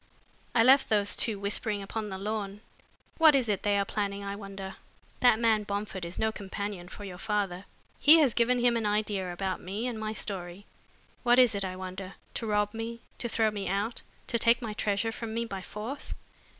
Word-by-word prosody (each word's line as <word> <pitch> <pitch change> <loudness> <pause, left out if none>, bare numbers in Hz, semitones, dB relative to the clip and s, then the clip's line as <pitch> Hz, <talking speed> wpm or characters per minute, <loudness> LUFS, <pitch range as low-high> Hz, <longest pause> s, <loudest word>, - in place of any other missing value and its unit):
I 225 - +6
left 265 +3 +6
those 205 -2 +3
two 220 -3 +2
whispering 200 +1 -1
upon 215 +1 -4
the 190 - -5
lawn. 205 0 -4 0.6
What 315 -3 +8
is 260 -4 +2
it 205 -3 0
they 205 -1 +2
are 200 - +1
planning, 200 -1 -2
I 200 0 -4
wonder? 195 -1 -7 0.4
That 245 -3 +6
man 225 -2 +3
Bomford 200 -3 -4
is 170 - -6
no 220 0 +1
companion 200 -3 -5
for 205 - -9
your 180 -3 -7
father. 200 -3 -1 0.3
He 305 +3 +8
has 285 -7 +4
given 245 +1 +3
him 240 -1 +3
an 225 -2 0
idea 205 -3 0
about 185 +1 -3
me 200 +6 -4
and 240 -3 -3
my 215 0 -3
story. 190 -2 -5 0.6
What 240 0 +4
is 250 -3 +6
it, 200 -1 -1
I 185 -1 -3
wonder? 185 +1 -7 0.2
To 230 - -3
rob 210 0 +1
me, 230 +1 -5 0.2
to 235 - -1
throw 220 -1 +2
me 205 -2 -4
out, 205 +5 -1 0.2
to 235 - 0
take 230 +2 +5
my 225 -4 -4
treasure 210 +1 0
from 225 -1 -5
me 235 0 0
by 195 -4 -5
force?" 215 +9 -6
210 Hz, 200 wpm, -29 LUFS, 195-230 Hz, 0.6 s, What